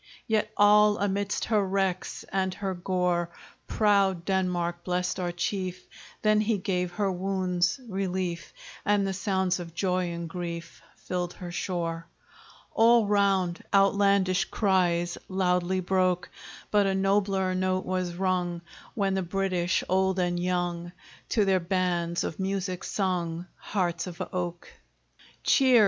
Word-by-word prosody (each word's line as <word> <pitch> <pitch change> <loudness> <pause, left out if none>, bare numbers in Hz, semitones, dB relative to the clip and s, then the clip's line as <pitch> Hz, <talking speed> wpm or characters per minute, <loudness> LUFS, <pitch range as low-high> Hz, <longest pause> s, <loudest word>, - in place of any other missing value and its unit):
Yet 215 -2 0
all 210 0 +6
amidst 200 0 -1
her 215 -3 +2
wrecks, 190 -1 -1
And 190 -1 0
her 195 -2 -3
gore, 180 -1 0 0.4
Proud 195 -5 +2
Denmark 175 -3 -1
blest 180 +1 -1
our 175 -1 -1
chief 185 +1 -3 0.4
That 215 0 +4
he 215 0 +1
gave 180 -2 -1
her 200 0 0
wounds 185 +1 0
relief; 185 -3 -3 0.3
And 205 -1 +2
the 195 - -1
sounds 190 -2 0
of 170 -1 -8
joy 180 -1 0
and 170 0 -5
grief 170 -1 -6
Filled 180 -1 -3
her 175 -1 -8
shore. 170 -2 -3 0.7
All 230 0 +5
round, 195 -4 +1
outlandish 195 -2 +3
cries 175 -4 +1
Loudly 185 -1 +1
broke; 185 -1 +1 0.4
But 205 -1 +4
a 195 - +1
nobler 195 -1 +1
note 185 0 0
was 185 -2 -2
rung, 180 -2 -1 0.3
When 195 -3 +1
the 190 - 0
British, 185 -1 0
old 190 0 +2
and 175 -1 0
young. 175 -1 -2 0.4
To 215 -3 +2
their 190 -1 +3
bands 175 -1 0
of 160 - -4
music 190 -1 -2
sung 175 -3 -1
'Hearts 175 -3 -2
of 175 -1 -8
Oak!' 175 -1 -3 0.8
Cheer! 260 -3 +5
185 Hz, 130 wpm, -27 LUFS, 175-195 Hz, 0.8 s, all